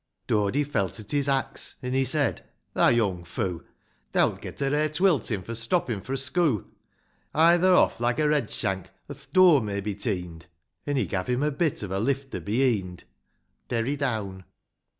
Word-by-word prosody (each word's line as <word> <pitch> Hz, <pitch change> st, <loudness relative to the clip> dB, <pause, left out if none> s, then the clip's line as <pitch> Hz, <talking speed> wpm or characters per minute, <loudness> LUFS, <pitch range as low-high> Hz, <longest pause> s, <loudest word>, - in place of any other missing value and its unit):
VIII. -, -, -5 dB
Dody 105 Hz, +8 st, +1 dB
felt 105 Hz, -, -2 dB
at 105 Hz, -, -7 dB
his 145 Hz, -1 st, 0 dB
axe, 135 Hz, -1 st, -1 dB
— -, -, -29 dB
an' 125 Hz, 0 st, -3 dB
he 135 Hz, 0 st, +2 dB
said, 140 Hz, +2 st, 0 dB, 0.3 s
"Thou -, -, +4 dB
young 100 Hz, -7 st, +1 dB
foo'; 90 Hz, 0 st, -4 dB, 0.5 s
Thou'lt -, -, +2 dB
get -, -, -8 dB
a 135 Hz, -1 st, 0 dB
rare 150 Hz, +1 st, +1 dB
twiltin' 150 Hz, -, +1 dB
for 115 Hz, -, -6 dB
stoppin' 115 Hz, -, -1 dB
fro' 130 Hz, +6 st, -4 dB
schoo'; 135 Hz, -, 0 dB, 0.7 s
Hie 165 Hz, +3 st, +6 dB
tho' 185 Hz, +1 st, +4 dB
off, -, -, +3 dB
like 120 Hz, 0 st, 0 dB
a 155 Hz, -, +2 dB
red 150 Hz, -7 st, +1 dB
shank, 95 Hz, -4 st, -2 dB, 0.2 s
or -, -, -6 dB
th' -, -, -18 dB
dur 185 Hz, -5 st, +7 dB
may 100 Hz, -2 st, -3 dB
be 105 Hz, +1 st, -3 dB
teen'd: 90 Hz, -6 st, -4 dB, 0.2 s
' -, -, -44 dB
An' 145 Hz, -, 0 dB
he 130 Hz, -, +1 dB
gav' 95 Hz, -3 st, -3 dB
him 125 Hz, +3 st, 0 dB
a 150 Hz, -, +1 dB
bit 150 Hz, -4 st, -1 dB
of 100 Hz, -, -5 dB
a 95 Hz, -, -1 dB
lifter 135 Hz, +4 st, -2 dB
beheend. 105 Hz, -6 st, 0 dB, 0.7 s
Derry 120 Hz, +4 st, 0 dB
down. 110 Hz, -9 st, -3 dB
125 Hz, 190 wpm, -26 LUFS, 100-145 Hz, 0.7 s, dur